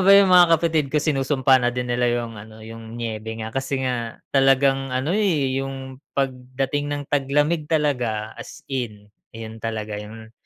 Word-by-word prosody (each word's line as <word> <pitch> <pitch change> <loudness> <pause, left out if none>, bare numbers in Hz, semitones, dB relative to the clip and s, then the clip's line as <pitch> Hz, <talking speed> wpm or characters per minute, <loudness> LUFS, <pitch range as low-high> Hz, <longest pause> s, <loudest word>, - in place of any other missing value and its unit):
ba 195 +1 +6
yung 195 -2 +6
mga 175 -2 +7
kapatid 160 -3 0
ko, 150 - -2
sinusumpa 135 -3 +3
na 120 - +2
din 125 0 -2
nila 120 0 +1
yung 120 -1 -1
ano, 110 +1 -11
yung 115 0 -9
niyebe 110 -1 -4
nga. 110 0 -5
Kasi 135 0 -2
nga 120 -3 -2 0.2
talagang 135 0 +3
ano, 130 +6 -1
eh, 150 -11 +1
yung 135 -1 -7 0.2
pagdating 135 +1 -2
ng 145 0 -2
taglamig 145 +3 +1
talaga 125 -9 0
as - - -11
in, 105 -6 -4 0.3
yun 110 0 -8
talaga 110 -2 -4
yung 110 +1 -11
130 Hz, 165 wpm, -23 LUFS, 115-145 Hz, 0.3 s, mga